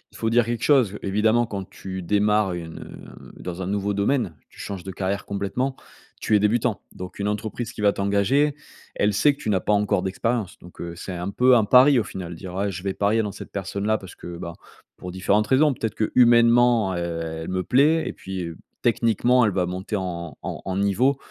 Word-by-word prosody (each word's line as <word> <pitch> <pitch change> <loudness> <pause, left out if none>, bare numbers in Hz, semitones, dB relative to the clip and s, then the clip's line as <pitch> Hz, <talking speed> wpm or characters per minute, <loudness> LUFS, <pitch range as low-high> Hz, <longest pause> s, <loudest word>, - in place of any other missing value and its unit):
faut 110 - -1
dire 120 0 +3
quelque 120 0 -3
chose, 125 -9 +3
évidemment, 110 +4 +2
quand 100 -3 -6
tu 95 -1 -7
démarres 105 +1 +2
une, 85 -2 -7
heu, - - -12
dans 90 0 -5
un 90 - -3
nouveau 100 +1 -1
domaine, 100 - 0
tu - - -19
changes 95 -3 -6
de 95 - -6
carrière 95 +1 -3
complètement, 100 +7 -2 0.4
tu 110 - +1
es - - +5
débutant. 110 +2 +1
Donc 90 +1 -9
une 100 - -1
entreprise 110 +3 -3
qui - - -7
va 100 -1 +4
t'engager, 100 +9 +1 0.4
elle 105 0 +1
sait 145 +9 +4
que - - -16
tu - - -3
n'as 95 -3 +2
pas 105 - 0
encore 100 -2 +1
d'expérience. 105 +1 -2
Donc, 90 - -13
heu, 85 0 -6
c'est 95 +2 -7
un 90 +2 -4
peu 125 +4 +5
un 110 -3 +4
pari, 130 +4 +6
au - - 0
final, 90 -3 -7
dire: 95 +3 -3
«Je 90 0 -7
vais 95 -1 -1
parier 105 +3 +1
dans 105 -2 -3
cette - - -10
personne-là 100 +2 -1
parce 95 -3 -12
que, 85 -1 -8
bah, 85 0 -6 0.4
pour 90 - -7
différentes 100 +3 +1
raisons, 145 +2 +4
peut-être 115 -4 -4
que 110 - -1
humainement, 120 -3 +5
heu, - - -3 0.5
elle - - -6
me 90 0 -1
plaît 150 - +3
et - - -4
puis, 95 -1 -6
heu, 85 -1 -7 0.2
techniquement, 120 +1 +3
elle 105 - +2
va 90 -2 0
monter 95 +4 -4
en 85 -4 -4
en - - -5
en 95 -1 -2
niveau 105 +8 +2
100 Hz, 215 wpm, -24 LUFS, 95-115 Hz, 0.5 s, pari